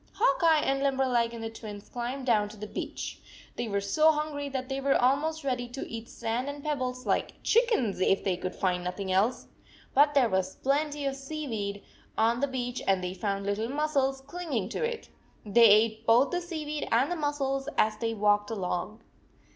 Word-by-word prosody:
Hawk 465 -1 +2
Eye 320 -2 +5
and 275 0 +1
Limberleg 260 -4 +1
and 230 -1 -7
the 225 - -3
Twins 210 -2 -9
climbed 250 +2 -4
down 210 -4 +2
to 215 - -12
the 210 - -6
beach. - - -5 0.4
They 240 - -3
were 200 -2 0
so 305 +11 +4
hungry 300 -2 -3
that 260 -1 -4
they 270 0 -3
were 275 0 +3
almost 295 +5 +1
ready 250 -3 -1
to 245 +3 -6
eat 230 0 -7
sand 235 +4 -3
and 285 0 -7
pebbles, 255 -4 -2
like - - 0
chickens, 445 - +2
if 195 +1 +2
they 190 -2 +1
could 180 +1 -5
find 180 -2 0
nothing 185 +2 -3
else. 200 +7 +1 0.5
But 290 +2 +5
there 265 -4 +5
was 190 -3 -1
plenty 290 +1 0
of 275 -1 -1
seaweed 260 -9 -4 0.3
on 230 +2 +3
the 280 - +1
in - - -10
beach 245 -1 -3
and 190 -2 +2
they 180 0 -3
found 195 +1 -2
little 205 +3 -1
mussels 275 -2 0
clinging 285 - -3
to - - -3
it. 465 -1 -3 0.4
They 230 +3 +6
ate 220 +2 +3
both 240 +5 +5
the 355 0 -1
seaweed 305 -4 -4
and 250 +8 +3
the - - 0
mussels, 285 -3 -1
as 215 0 +3
they 225 0 -2
walked 205 0 +2
along. 200 +1 -3
250 Hz, 195 wpm, -28 LUFS, 210-285 Hz, 0.5 s, They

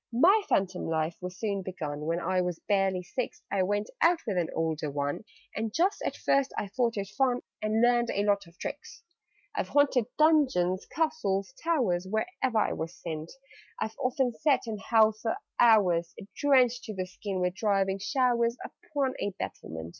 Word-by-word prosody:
"My 350 - +5
phantom 185 -1 0
life 160 +1 -1
was 180 0 -6
soon 200 -3 -2
begun: 155 -5 -5
When 165 +1 0
I 185 +1 +1
was 180 -2 -2
barely 195 -3 +1
six, 245 +7 -4
I 195 - +1
went 205 +3 0
out 340 +1 +5
with 210 -5 -1
an 175 -2 0
older 160 -2 -1
one 145 +7 -3 0.3
And 220 0 -2
just 360 - +1
at - - -2
first 275 -1 +2
I 200 - -2
thought 230 +1 0
it 195 -1 -3
fun, 250 +4 +1 0.2
And 215 +2 +1
learned 240 -1 +3
a 200 - 0
lot 200 -2 +1
of 170 +1 -19
tricks. - - -7 0.5
"I've - - -2
haunted 280 -5 +3
dungeons, 260 - +3
castles, 265 -10 -1
towers 230 - +1
Wherever 230 - -1
I - - +2
was 165 +2 -5
sent: 160 -1 -6 0.5
I've 220 - -3
often 255 -1 +1
sat 270 +1 +2
and 215 -3 -5
howled 220 0 +4
for 225 - 0 0.2
hours, 185 -8 +4 0.2
Drenched 255 -4 +3
to 215 - -6
the 185 -1 -2
skin 190 +1 -5
with 180 0 0
driving 195 -1 +1
showers, 235 +1 +1
Upon 275 -3 -3
a - - -1
battlement. 80 0 -6
205 Hz, 175 wpm, -29 LUFS, 180-250 Hz, 0.5 s, My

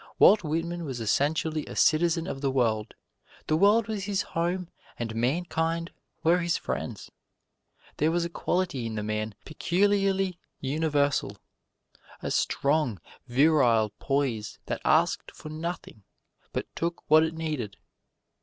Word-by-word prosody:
Walt 210 -3 +7
Whitman 170 +2 -2
was 135 -6 -4
essentially 150 +7 +1
a - - -7
citizen 165 +1 +3
of 135 -7 -5
the 140 - +1
world: 115 -5 0 0.5
the 155 - +1
world 205 +6 +4
was 210 -3 -3
his 200 -1 0
home 175 +2 -2 0.3
and 115 -2 -3
mankind 165 +6 -1 0.3
were 170 +2 +4
his 170 -1 +1
friends. - - -5 0.9
There 155 - +3
was 170 +1 +1
a - - -3
quality 175 -10 -1
in 110 - -5
the 105 - -2
man 110 0 -2
peculiarly 195 +1 +1 0.2
universal: 145 -1 0 0.8
a - - -4
strong, 140 - +1 0.3
virile 125 -5 +4
poise 130 -7 -1
that - - -3
asked - - +2
for 155 - -9
nothing, 160 - -6 0.5
but - - -2
took 170 0 -3
what 155 +1 +7
it 160 0 0
needed. 150 -10 -3
155 Hz, 135 wpm, -27 LUFS, 130-170 Hz, 0.9 s, Walt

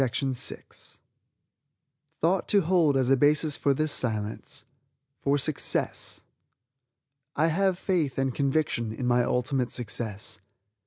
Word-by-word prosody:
THOUGHT 175 +2 +2
TO 200 - +4
HOLD 165 -5 +2
AS 130 0 +1
A - - +6
BASIS 150 +2 +3
FOR 140 -1 +1
THIS 155 +2 0
SILENCE 110 -5 -2 0.6
FOR 140 +1 +2
SUCCESS 145 +1 0 1.1
"I 155 - +2
Have 185 +3 +1
Faith 170 -8 -1
and 135 -1 0
Conviction 135 -5 0
in 125 - -5
My 120 0 +3
Ultimate 125 +1 0
Success." 110 -4 -4
140 Hz, 110 wpm, -27 LUFS, 125-155 Hz, 1.1 s, A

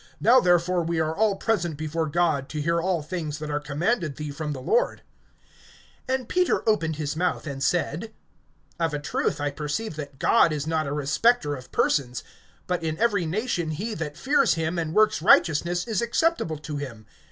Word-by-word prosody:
Now 240 +5 +6
therefore 175 -3 +2
we 170 0 -1
are 160 0 0
all 210 0 +2
present 175 -8 -1
before 155 +1 -2
God, 155 -4 0
to 150 - -4
hear 170 +3 +1
all 175 -3 0
things 155 -2 -4
that 150 -1 -5
are 145 - 0
commanded 155 - -1
thee 150 -1 -5
from 150 +1 -4
the 140 - -5
Lord. - - 0 1.1
(34)And 260 -2 -1
Peter 365 -8 +1
opened 165 -8 +1
his 150 0 -3
mouth, 180 +1 -1
and 140 -2 -5
said: 175 +4 -1 0.7
Of 165 -3 0
a - - -2
truth 145 - -1
I 145 0 -1
perceive 150 +6 -4
that 145 -2 -7
God 170 - +4
is 150 -1 -2
not 160 -1 -1
a - - -3
respecter 150 - +2
of 130 -1 -12
persons; 125 -4 0 0.4
(35)but 180 -1 -1
in 160 -1 -2
every 205 -6 +1
nation 175 -2 -1
he 205 +9 -3
that 155 -5 -5
fears 275 - +3
him, 165 +1 -1
and 160 -1 -3
works 215 0 +4
righteousness, 175 +1 +4
is 225 -1 -1
acceptable 235 - 0
to 150 0 -6
him. 120 -6 -7
165 Hz, 185 wpm, -25 LUFS, 150-195 Hz, 1.1 s, Now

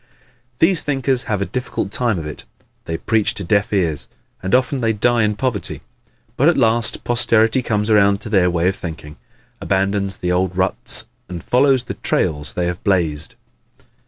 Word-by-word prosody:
These 170 +2 +3
thinkers 135 -3 -1
have 105 -4 -1
a - - -3
difficult 125 -5 -4
time 115 -3 +1
of 80 - -5
it. 75 - -7 0.4
They 80 - -3
preach 110 +2 0
to 100 - -6
deaf 100 +3 +1
ears. 80 -10 0 0.3
And 95 +5 +1
often 130 +2 +1
they 115 -1 +1
die 120 +3 +2
in 105 -1 +1
poverty. 120 -2 -3 0.6
But 145 +6 +5
at 175 - +2
last 115 -2 +1
posterity 115 +1 +2
comes 105 -2 -1
around 100 -1 +4
to 110 - -7
their 95 -4 +3
way 85 0 +1
of 95 - +1
thinking, 80 -4 -8 0.4
abandons 100 0 0
the 90 - -2
old 90 0 0
ruts 95 0 0 0.2
and 90 -2 -6
follows 130 0 +3
the - - -5
trails 75 -4 -1
they 90 - 0
have 90 0 -4
blazed. 80 -6 0
100 Hz, 175 wpm, -19 LUFS, 90-120 Hz, 0.6 s, But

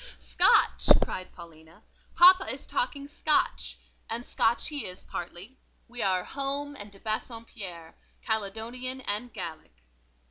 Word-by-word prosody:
Scotch!" - - +3 0.2
cried 185 0 -5
Paulina; 165 -1 -15 0.3
"papa 370 +2 +7
is - - -6
talking 290 - -2
Scotch; 295 +1 0 0.3
and 230 +2 -4
Scotch 230 +1 +1
he 295 -2 -4
is, 180 0 -7
partly. 180 +9 -7 0.3
We 240 0 -6
are 185 -2 +2
Home 280 +3 -3
and 205 -5 -6
de 195 - -14
Bassompierre, 215 -6 -6 0.3
Caledonian 230 +5 -3
and 225 +2 -3
Gallic." 160 - -8
220 Hz, 120 wpm, -28 LUFS, 175-260 Hz, 0.3 s, papa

